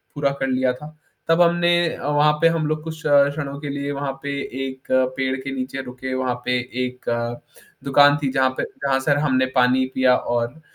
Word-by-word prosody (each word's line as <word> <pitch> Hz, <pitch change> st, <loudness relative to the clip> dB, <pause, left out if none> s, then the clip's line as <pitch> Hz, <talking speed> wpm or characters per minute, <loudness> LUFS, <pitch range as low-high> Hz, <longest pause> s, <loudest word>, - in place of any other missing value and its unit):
पूरा 140 Hz, -1 st, +1 dB
कर 135 Hz, -, 0 dB
लिया 130 Hz, -1 st, +1 dB
था। 150 Hz, +4 st, -12 dB, 0.3 s
तब 165 Hz, +1 st, +4 dB
हमने 175 Hz, 0 st, +4 dB, 0.2 s
अ, -, -, -6 dB
वहाँ 150 Hz, +1 st, +4 dB
पे 165 Hz, -, +6 dB
हम 165 Hz, -1 st, 0 dB
लोग 155 Hz, 0 st, -2 dB
कुछ 160 Hz, 0 st, -7 dB
क्ष 140 Hz, -1 st, +5 dB
क्षणों 140 Hz, -2 st, -5 dB
के 145 Hz, -1 st, -6 dB
लिए 140 Hz, 0 st, -3 dB
वहाँ 140 Hz, -1 st, -3 dB
पे 140 Hz, -, -3 dB, 0.4 s
एक 130 Hz, 0 st, -10 dB, 0.3 s
पेड़ 130 Hz, 0 st, 0 dB
के 135 Hz, -, -5 dB
नीचे 130 Hz, +1 st, -4 dB
रुके 130 Hz, +1 st, -6 dB
वहाँ 130 Hz, -1 st, -1 dB
पे 125 Hz, 0 st, +1 dB, 0.3 s
एक 125 Hz, 0 st, -9 dB, 0.8 s
दुकान 145 Hz, +1 st, +5 dB
थी 135 Hz, -, +1 dB
जहाँ 130 Hz, -1 st, +2 dB
पे -, -, -1 dB
जहाँ 135 Hz, -1 st, -1 dB
से 140 Hz, +2 st, 0 dB
हमने 130 Hz, -3 st, +2 dB
पानी 130 Hz, +1 st, +3 dB
पिया 130 Hz, -1 st, +4 dB
और 120 Hz, +6 st, -3 dB
140 Hz, 200 wpm, -22 LUFS, 130-150 Hz, 0.8 s, पे